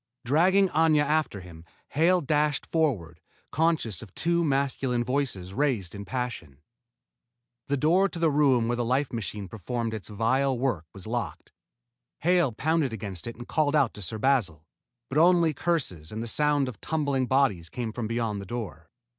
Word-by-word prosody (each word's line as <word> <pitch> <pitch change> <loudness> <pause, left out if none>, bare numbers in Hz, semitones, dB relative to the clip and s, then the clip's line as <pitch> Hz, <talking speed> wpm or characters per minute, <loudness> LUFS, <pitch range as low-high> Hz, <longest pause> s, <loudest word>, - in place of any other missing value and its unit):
Dragging 185 +9 +4
Aña 155 -2 +3
after 150 -9 0
him, 85 -3 -12 0.3
Hale 175 +5 +3
dashed 150 0 +1
forward, 100 - -1 0.3
conscious 155 - +1
of 110 -5 -11
two 170 0 +1
masculine 135 -4 0
voices 120 -8 -2
raised 115 -9 0
in 100 0 -7
passion. 120 - -4 1.1
The 140 - 0
door 175 +8 +3
to - - -8
the 165 -2 +2
room 135 -5 +3
where 120 - 0
the 120 - -1
life 130 +4 0
machine 105 -3 -4
performed 110 +4 -4
its 110 -3 -6
vile 130 +5 +1
work 120 - -1
was 95 -1 -11
locked. 120 +1 -4 0.7
Hale 175 -4 +3
pounded 145 +2 0
against 100 -5 -6
it 115 - -6
and 120 +1 -10
called 155 -1 +1
out 140 -6 +3
to 105 - -10
Sir 95 +4 -4
Basil, 105 - +1 0.4
but 135 +5 0
only 170 -1 +5
curses 130 - -2
and 110 +1 -4
the - - -4
sound 145 +2 +2
of 125 - -8
tumbling 140 -5 0
bodies 125 -12 +1
came 120 -3 -4
from 115 0 -3
beyond 115 -3 -2
the 100 - -9
door. 90 -9 -6
125 Hz, 170 wpm, -27 LUFS, 110-150 Hz, 1.1 s, only